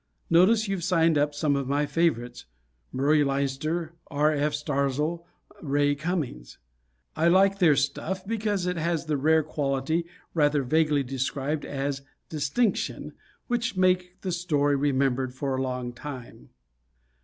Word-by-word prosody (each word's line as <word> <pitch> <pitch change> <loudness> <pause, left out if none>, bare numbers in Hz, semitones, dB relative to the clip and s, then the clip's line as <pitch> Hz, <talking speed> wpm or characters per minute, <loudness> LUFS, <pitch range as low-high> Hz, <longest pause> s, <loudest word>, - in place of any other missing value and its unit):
Notice 210 +6 +5
you've 195 -3 -2
signed 165 -3 +3
up 145 0 +1
some 145 -1 +1
of 140 -2 -2
my 145 +2 +1
favorites, 125 -7 -1 0.5
Murray 145 +3 +3
Leinster, 140 +4 -2 0.2
R. 150 0 +2
F. 150 +1 0
Starzl, 150 +3 -1 0.4
Ray 145 -1 +1
Cummings. 145 - -4 0.6
I 165 - +2
like 195 +3 +4
their 165 -6 +5
stuff 185 +8 -2
because 210 -3 -1
it 180 -1 -1
has 165 0 -1
the 155 -1 0
rare 160 +3 +3
quality 145 +2 -1 0.3
rather 145 -3 +2
vaguely 150 +1 +2
described 135 +3 -2
as 140 0 -3 0.3
"distinction," 160 - -1 0.3
which 235 -4 -2
make 185 0 +1
the 185 - -3
story 150 -5 +1
remembered 135 -2 0
for 135 0 -2
a 130 - -1
long 125 -2 -3
time. 130 -1 -9
150 Hz, 135 wpm, -26 LUFS, 140-170 Hz, 0.6 s, Notice